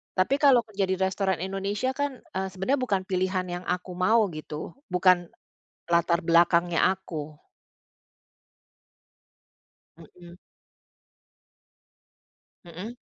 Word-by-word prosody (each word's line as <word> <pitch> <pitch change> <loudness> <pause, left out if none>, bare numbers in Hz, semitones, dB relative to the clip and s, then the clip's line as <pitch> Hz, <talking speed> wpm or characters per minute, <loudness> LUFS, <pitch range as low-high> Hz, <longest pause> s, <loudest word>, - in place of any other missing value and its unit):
Tapi 185 +9 +2
kalau 275 -5 +6
kerja 205 -3 -2
di 190 - 0
restoran 190 -1 0
Indonesia 200 +6 -2
kan, 280 -2 -3
eee, 190 +1 -4
sebenarnya 195 +9 0
bukan 210 -7 0
pilihan 185 0 -1
yang 175 +1 -5
aku 180 +1 -2
mau 215 +4 +3
gitu, 155 -1 -7 0.2
bukan 180 -1 +3 0.6
latar 170 +1 +2
belakangnya 170 0 +4
aku. 155 -5 -7 2.6
Mhm. 170 +2 -15 2.3
Mhm. 185 +8 -8
185 Hz, 95 wpm, -26 LUFS, 175-200 Hz, 2.6 s, kalau